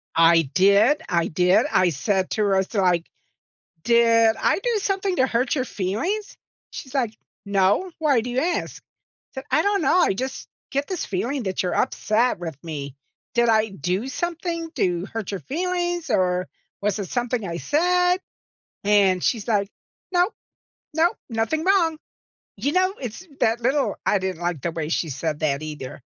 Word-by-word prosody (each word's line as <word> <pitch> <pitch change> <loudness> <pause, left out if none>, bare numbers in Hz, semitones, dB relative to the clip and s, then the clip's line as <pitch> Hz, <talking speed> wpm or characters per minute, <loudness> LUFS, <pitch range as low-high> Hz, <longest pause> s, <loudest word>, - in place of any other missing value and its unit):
I 165 -3 +5
did, 200 +9 +4
I 170 -3 +1
did, 180 +3 +3
I 185 -1 +4
said 190 +5 -1
to 215 - +1
Rosa, 195 +1 +1
like, 175 -2 +2 0.8
"Did 230 -1 +4
I - - +2
do 465 +1 0
something 390 -2 -1
to 260 - +3
hurt 245 +1 0
your 260 -4 0
feelings?" 295 - -3 0.3
She's 260 0 -9
like, 240 -5 0 0.3
"No, 200 - +2
why 290 -6 +3
do 245 - -5
you 245 - -2
ask?" 350 +3 -2 0.5
Said, 265 0 -7
"I 315 - +4
don't 405 -2 +1
know, 300 +5 +3
I 345 - +3
just 260 +6 -5 0.2
get 280 +1 -1
this 370 -3 -3
feeling 235 +8 -2
that 190 -1 -2
you're 180 - -1
upset 225 +2 +1
with 165 -5 -6
me. 140 -4 -6 0.4
Did 235 -1 +3
I 220 -1 +3
do 190 - -2
something 335 +2 -3
to 175 -1 0
hurt 220 -3 -5
your 195 - -3
feelings? 350 - -2
Or, 185 -4 +1 0.3
was 210 0 0
it 195 -4 -4
something 245 -4 -1
I 170 - -4
said?" 360 - +2 0.7
and 200 -3 +4
she's 230 -2 0
like, 200 -3 +1 0.4
"No. 355 +2 +3 0.7
No. 335 +2 +4 0.2
Nothing 230 +8 -1
wrong." 345 -5 +3 0.6
You 285 - -1
know? 370 +1 +2
It's 250 - -7
that 225 +2 +2
little 265 +4 +1
I 205 - +3
didn't 185 -2 -4
like 170 -5 -2
the 170 - -2
way 155 -2 -3
she 165 -1 -1
said 150 +3 -3
that 145 -2 0
either. 150 -4 -7
225 Hz, 170 wpm, -23 LUFS, 185-310 Hz, 0.8 s, I